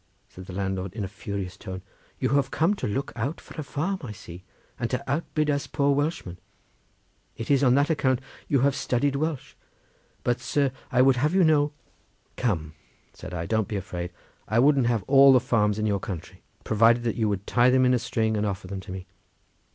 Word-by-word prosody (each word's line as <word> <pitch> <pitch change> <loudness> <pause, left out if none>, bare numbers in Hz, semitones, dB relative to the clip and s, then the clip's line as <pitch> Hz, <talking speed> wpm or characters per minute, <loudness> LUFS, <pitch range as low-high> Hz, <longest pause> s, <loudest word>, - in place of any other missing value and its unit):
said 95 0 -12
the 95 - -8
landlord 95 -1 -2
in 110 -1 -4
a - - -2
furious 100 -2 -5
tone, 95 -2 -8 0.3
"you 130 - 0
have 140 +1 +2
come 165 +6 +2
to 205 - -3
look 135 +7 -3
out 135 +7 -3
for - - -14
a - - -5
farm, 170 +8 -2
I 125 -7 -6
see, 90 -3 -11 0.4
and - - -1
to - - -2
outbid 155 +1 -1
us 140 -1 -1
poor 140 -1 +2
Welshmen; 140 - -2 1.0
it 115 +4 -3
is 140 0 +4
on 125 -2 +5
that 145 +3 +3
account 130 -5 +1 0.3
you 140 -3 +2
have 140 0 +3
studied 140 +1 0
Welsh; 140 -2 -3 0.7
but, 120 0 +1
sir, 140 -2 0 0.2
I 125 0 +5
would 135 -1 +4
have 150 +7 +1
you 190 - +5
know—" 150 -2 +3 0.6
"Come," 80 -11 -1 0.4
said - - -9
I, 85 -1 -3
"don't 110 +2 0
be 105 - -4
afraid; 90 -3 -4 0.4
I 110 - 0
wouldn't 135 0 +4
have 115 -4 +1
all 135 +3 +7
the 130 - +6
farms 105 -4 +1
in 110 - -1
your 100 -2 +1
country, 95 -5 -7 0.2
provided 115 +2 +3
you 110 -3 +1
would 100 -1 -2
tie 120 0 +4
them 130 0 +4
in 125 - +4
a 125 - +3
string 110 -1 0
and 105 - 0
offer 100 -1 -3
them 95 +1 -5
to 95 - -9
me. 95 -1 -6
120 Hz, 205 wpm, -26 LUFS, 100-140 Hz, 1.0 s, all